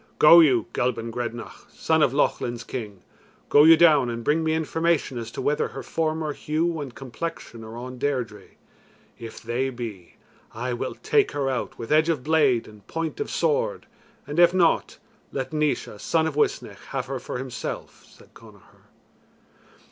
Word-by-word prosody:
"Go 165 Hz, +3 st, +9 dB
you, 130 Hz, -9 st, +4 dB
Gelban 115 Hz, -2 st, -1 dB
Grednach, 120 Hz, 0 st, -6 dB
son 160 Hz, -1 st, +1 dB
of 140 Hz, -, +4 dB
Lochlin's 120 Hz, -4 st, 0 dB
King, 105 Hz, -7 st, -7 dB, 0.5 s
go 145 Hz, +1 st, +7 dB
you 165 Hz, 0 st, +8 dB
down 150 Hz, -7 st, +5 dB
and 115 Hz, 0 st, -4 dB
bring 155 Hz, +6 st, +1 dB
me 160 Hz, 0 st, +1 dB
information 160 Hz, -4 st, 0 dB
as 115 Hz, -1 st, -6 dB
to -, -, -6 dB
whether 145 Hz, +1 st, +1 dB
her -, -, -8 dB
former 155 Hz, -1 st, -2 dB
hue 160 Hz, +2 st, -1 dB
and 135 Hz, -4 st, -7 dB
complexion 135 Hz, -3 st, -7 dB
are 110 Hz, +1 st, -9 dB
on 125 Hz, +1 st, -8 dB
Deirdre. 125 Hz, -7 st, -2 dB, 0.7 s
If 115 Hz, 0 st, -9 dB
they 120 Hz, +3 st, -1 dB
be, 115 Hz, -8 st, -8 dB, 0.4 s
I 125 Hz, +2 st, -3 dB
will 120 Hz, -, -4 dB
take 425 Hz, -2 st, +1 dB
her 135 Hz, -2 st, -1 dB
out 125 Hz, -, -4 dB
with 115 Hz, +2 st, -7 dB
edge 155 Hz, +2 st, +4 dB
of 150 Hz, -6 st, 0 dB
blade 145 Hz, -6 st, +2 dB
and 105 Hz, -2 st, -16 dB
point 165 Hz, -1 st, -4 dB
of 430 Hz, -, -3 dB
sword, -, -, 0 dB, 0.4 s
and 145 Hz, +3 st, -3 dB
if 175 Hz, +1 st, +6 dB
not, 170 Hz, -3 st, +2 dB, 0.3 s
let 135 Hz, +1 st, -4 dB
Naois, 150 Hz, -8 st, -1 dB
son 160 Hz, +7 st, +1 dB
of 160 Hz, -, -2 dB
Uisnech, 105 Hz, -8 st, -1 dB
have 135 Hz, -2 st, -3 dB
her 135 Hz, 0 st, -4 dB
for -, -, -6 dB
himself," 130 Hz, -1 st, -6 dB
said -, -, -20 dB
Connachar. -, -, -18 dB
135 Hz, 170 wpm, -24 LUFS, 120-160 Hz, 0.7 s, Go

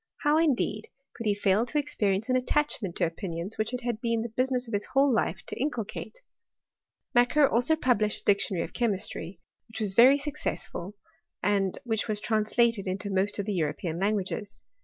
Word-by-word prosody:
How, 300 Hz, +1 st, +4 dB
indeed, 245 Hz, -9 st, +1 dB, 0.3 s
could 230 Hz, -, -5 dB
he 205 Hz, -, +3 dB
&0 205 Hz, +2 st, +2 dB
to 300 Hz, -, -2 dB
experience 215 Hz, -8 st, 0 dB
an 255 Hz, -, +2 dB
attachment 255 Hz, -, 0 dB
to -, -, +1 dB
opinions 170 Hz, +3 st, -5 dB
which 215 Hz, +1 st, 0 dB
it 250 Hz, -1 st, -3 dB
had 235 Hz, -2 st, -3 dB
been 230 Hz, -2 st, 0 dB
the 235 Hz, -, -4 dB
business 255 Hz, +2 st, 0 dB
of 230 Hz, -, -8 dB
his 205 Hz, 0 st, 0 dB
whole 270 Hz, 0 st, +3 dB
life 195 Hz, -4 st, 0 dB
to -, -, -6 dB
inculcate? 285 Hz, -, -4 dB, 0.9 s
Macquer 250 Hz, +4 st, +5 dB
also 245 Hz, +7 st, +2 dB
published 225 Hz, -8 st, +1 dB
a -, -, -34 dB
dictionary 195 Hz, -3 st, +2 dB
of -, -, -12 dB
chemistry, 195 Hz, -6 st, -2 dB, 0.3 s
which 225 Hz, -, -8 dB
was 205 Hz, -3 st, -1 dB
very 255 Hz, +7 st, +7 dB
successful, 280 Hz, -, -4 dB, 0.5 s
and 195 Hz, -1 st, +1 dB
which 225 Hz, -3 st, -1 dB
was 215 Hz, -2 st, -1 dB
translated 220 Hz, 0 st, +1 dB
into 195 Hz, +2 st, -3 dB
most 195 Hz, +2 st, +1 dB
of 200 Hz, -, -2 dB
the 210 Hz, -, -2 dB
European 165 Hz, 0 st, -2 dB
languages. 205 Hz, +1 st, -2 dB
215 Hz, 180 wpm, -28 LUFS, 195-250 Hz, 0.9 s, very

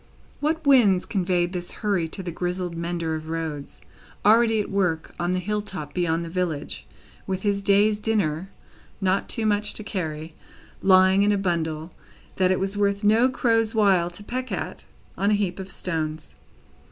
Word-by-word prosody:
What 310 Hz, +1 st, -1 dB
winds 225 Hz, -10 st, +5 dB
conveyed 180 Hz, -3 st, 0 dB
this 175 Hz, -1 st, -5 dB
hurry 195 Hz, -6 st, 0 dB
to 190 Hz, +4 st, -7 dB
the 175 Hz, -, -4 dB
grizzled 180 Hz, 0 st, -3 dB
mender 170 Hz, -1 st, -2 dB
of 155 Hz, 0 st, -5 dB
roads, 160 Hz, -3 st, -5 dB, 0.4 s
already 225 Hz, +1 st, +5 dB
at 205 Hz, -, -3 dB
work 180 Hz, -5 st, 0 dB
on 175 Hz, 0 st, 0 dB
the 185 Hz, -, +1 dB
hill 210 Hz, +3 st, -1 dB
top 165 Hz, -8 st, -7 dB
beyond 170 Hz, -2 st, 0 dB
the -, -, -6 dB
village, 170 Hz, -4 st, -3 dB, 0.4 s
with 190 Hz, -1 st, -3 dB
his 200 Hz, -1 st, +1 dB
day's 205 Hz, +1 st, +3 dB
dinner 195 Hz, -6 st, 0 dB, 0.5 s
(not 195 Hz, +4 st, 0 dB
much 210 Hz, -2 st, +1 dB
to 215 Hz, -, -3 dB
carry) 160 Hz, -6 st, -4 dB, 0.5 s
lying 190 Hz, 0 st, +5 dB
in 205 Hz, +1 st, +4 dB
a 205 Hz, -, +2 dB
bundle 165 Hz, -3 st, -2 dB, 0.5 s
that 185 Hz, -1 st, +3 dB
it 185 Hz, -, +1 dB
was 195 Hz, +1 st, -2 dB
worth 200 Hz, 0 st, +1 dB
no 225 Hz, +5 st, +5 dB
crow's 225 Hz, -3 st, +1 dB
while 190 Hz, -5 st, +4 dB
to 175 Hz, +4 st, -10 dB
peck 255 Hz, +4 st, -4 dB
at, -, -, -4 dB, 0.3 s
on 200 Hz, -, +2 dB
a 210 Hz, -, +4 dB
heap 195 Hz, -3 st, -1 dB
of 190 Hz, 0 st, -6 dB
stones? 155 Hz, -4 st, -3 dB
190 Hz, 170 wpm, -24 LUFS, 170-210 Hz, 0.5 s, winds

